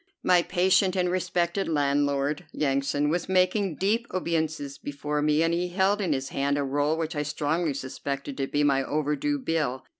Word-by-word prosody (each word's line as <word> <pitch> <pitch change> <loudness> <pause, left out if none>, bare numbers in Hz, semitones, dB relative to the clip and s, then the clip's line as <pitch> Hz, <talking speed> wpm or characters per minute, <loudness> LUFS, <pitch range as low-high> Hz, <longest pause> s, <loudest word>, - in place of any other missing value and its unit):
My 180 -1 +5
patient 185 +1 +2
and 180 -1 +1
respected 180 +1 0
landlord, 145 +1 0
Yansan, 140 +1 0
was 175 +2 -2
making 185 -1 +2
deep 220 +7 0
obeisances 160 -5 -2
before 145 +1 -3
me, 150 +1 +3
and 165 0 +1
he 175 +1 0
held 190 +3 +1
in 180 -5 0
his 135 -2 -1
hand 140 +1 0
a 145 - 0
roll 145 +3 0
which 160 -1 -3
I 150 - 0
strongly 150 +1 -1
suspected 140 +1 -5
to 135 -1 -1
be 145 +1 0
my 135 -2 +3
overdue 150 - -1
bill. 155 - -2
155 Hz, 175 wpm, -26 LUFS, 145-180 Hz, -, My